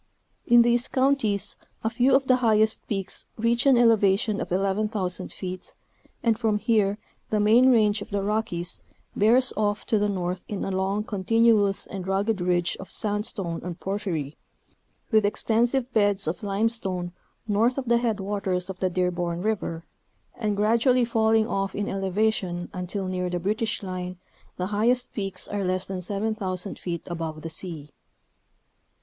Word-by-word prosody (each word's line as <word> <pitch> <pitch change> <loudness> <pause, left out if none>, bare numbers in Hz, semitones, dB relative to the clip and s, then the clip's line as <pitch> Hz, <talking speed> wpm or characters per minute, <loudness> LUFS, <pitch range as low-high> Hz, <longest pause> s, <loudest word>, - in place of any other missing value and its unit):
In 240 0 +7
these 240 +1 +5
counties 260 -7 +1 0.3
a 220 - +1
few 255 +3 +3
of 270 0 +2
the 255 -1 +4
highest 220 -3 +2
peaks 195 -3 -2
reach 235 +3 +1
an 265 -3 +6
elevation 215 -2 +3
of - - -5
11,000 195 -1 -1
feet, 185 -1 -7 0.5
and 230 -2 +2
from 220 -3 +1
here 210 -2 +1 0.3
the 215 - +1
main 230 +5 +5
range 215 -3 +3
of - - -8
the 200 -1 -2
Rockies 200 -5 0 0.3
bears 245 +5 +3
off 205 0 -1
to 215 - +1
the 205 0 +1
north 180 -2 -3
in 205 - -4
a - - -3
long, 190 +2 -1
continuous 210 0 +2
and 190 -2 -7
rugged 195 +1 0
ridge 175 -1 +1
of 190 - -10
sand 210 0 -1
stone 170 -6 -4
and 175 -1 -6
porphyry, 185 -8 -3 0.7
with 215 -1 +4
extensive 240 +5 +1
beds 205 -2 +4
of 165 +3 -3
limestone 195 -3 -1 0.4
north 225 +5 +2
of 270 - -2
the 235 0 +4
headwaters 195 -5 -1
of 185 - -11
the 185 - +1
Dearborn 175 -1 -1
River, 180 -6 -2 0.5
and 210 -3 -2
gradually 235 +4 +3
falling 220 -1 +2
off 195 -2 -2
in 205 - -2
elevation, 195 -2 -1
until 185 +1 -3
near 180 -1 -2
the 175 0 -2
British 210 +4 -2
line 185 -1 -5 0.4
the 180 - -2
highest 245 +4 +1
peaks 195 -3 -3
are 205 -1 -3
less 185 0 -1
than 190 -1 -5
7,000 200 -1 -3
feet 170 -2 -4
above 165 -3 -5
the 165 - -5
sea. 160 -4 -5
205 Hz, 155 wpm, -25 LUFS, 185-225 Hz, 0.7 s, In